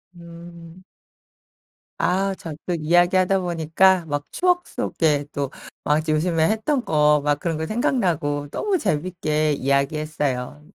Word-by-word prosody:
음. 170 Hz, +1 st, -13 dB, 1.1 s
아 195 Hz, +2 st, +1 dB
저 170 Hz, -5 st, -8 dB
또 180 Hz, -, -1 dB
이야기하다 175 Hz, +4 st, +3 dB
보니까 175 Hz, +1 st, +2 dB
막 145 Hz, -2 st, -3 dB
추억 355 Hz, -1 st, +1 dB
속에 150 Hz, -3 st, 0 dB
또 140 Hz, -2 st, -2 dB, 0.3 s
막 155 Hz, +2 st, +1 dB
요즘에 160 Hz, +1 st, +1 dB
했던 240 Hz, +5 st, 0 dB
거 150 Hz, -1 st, +3 dB
막 145 Hz, -1 st, +1 dB
그런 165 Hz, -1 st, -2 dB
거 160 Hz, -, -3 dB
생각나고 165 Hz, -, -1 dB
너무 405 Hz, -3 st, 0 dB
재밌게 155 Hz, -, -1 dB
이야기했어요. 140 Hz, -1 st, -1 dB
165 Hz, 245 characters per minute, -22 LUFS, 150-185 Hz, 1.1 s, 이야기하다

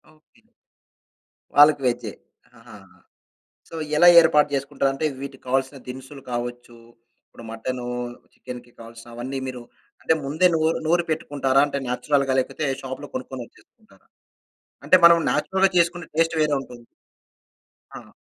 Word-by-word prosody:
Okay. 155 Hz, -, -31 dB, 1.1 s
వాళ్ళకి 145 Hz, -1 st, +7 dB
వెజ్జే. 120 Hz, 0 st, -2 dB, 0.5 s
ఆహాహా! -, -, -16 dB, 0.7 s
So, 165 Hz, -, -10 dB, 0.2 s
ఎలా 175 Hz, -, +6 dB
ఏర్పాటు 150 Hz, -2 st, +3 dB
చేసుకుంటారు? 135 Hz, 0 st, -1 dB
అంటే 145 Hz, +3 st, -3 dB, 0.2 s
వీటికి 140 Hz, -1 st, -9 dB
కావాల్సిన 135 Hz, +2 st, -1 dB
దినుసులు 130 Hz, +2 st, -9 dB
కావచ్చు, 120 Hz, 0 st, -5 dB, 0.5 s
ఇప్పుడు 115 Hz, -, -15 dB
మటను, 120 Hz, +2 st, -5 dB, 0.5 s
చికెన్‌కి 125 Hz, -1 st, -10 dB
కావాల్సిన 115 Hz, +1 st, -12 dB
అవన్నీ 130 Hz, +3 st, -5 dB
మీరు 125 Hz, -1 st, -6 dB, 0.4 s
అంటే 160 Hz, -, +2 dB
ముందే 155 Hz, +6 st, +3 dB
నూరు 160 Hz, +1 st, +1 dB
నూరి 175 Hz, +1 st, +2 dB
పెట్టుకుంటారా 140 Hz, -3 st, 0 dB
అంటే 140 Hz, -1 st, -4 dB
నేచురల్‌గా 135 Hz, +1 st, 0 dB
లేకపోతే 150 Hz, +4 st, -3 dB, 0.2 s
షాప్‌లో 135 Hz, +2 st, -7 dB
కొనుక్కొనివచ్చేస్తుంటారా? 130 Hz, -, -10 dB, 0.8 s
అంటే 185 Hz, -, +6 dB
మనం 170 Hz, 0 st, +9 dB
నేచురల్‌గా 190 Hz, 0 st, +1 dB
చేసుకునే 170 Hz, 0 st, 0 dB
టేస్ట్ 165 Hz, 0 st, +1 dB
వేరేవుంటుంది. 135 Hz, -5 st, -2 dB, 1.1 s
ఆహా! -, -, -14 dB
135 Hz, 120 wpm, -23 LUFS, 125-155 Hz, 1.1 s, మనం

